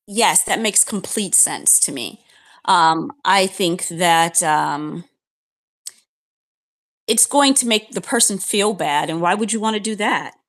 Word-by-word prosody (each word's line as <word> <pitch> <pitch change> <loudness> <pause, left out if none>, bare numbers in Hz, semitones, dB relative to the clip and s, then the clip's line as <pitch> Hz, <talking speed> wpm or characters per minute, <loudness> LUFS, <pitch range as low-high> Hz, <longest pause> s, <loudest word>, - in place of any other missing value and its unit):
Yes, 215 +3 +2
that - - -3
makes 215 -2 +3
complete 205 -1 -4
sense - - +4
to - - +2
me. - - -10 0.4
Um, 160 - +1
I 190 -1 +3
think 185 -2 -4
that, 165 -1 +1
um 150 +2 -3 2.0
it's 225 +1 +4
going 280 +2 +2
to 250 -3 +2
make 215 -1 -1
the 195 - -8
person 230 +1 +1
feel 205 +2 -1
bad, 150 -7 -3
and 165 +1 -6
why 175 +1 +1
would 210 +1 -4
you 225 - -4
wanna 220 0 -3
do 220 +1 -6
that? 210 +1 -4
200 Hz, 155 wpm, -17 LUFS, 170-220 Hz, 2.0 s, sense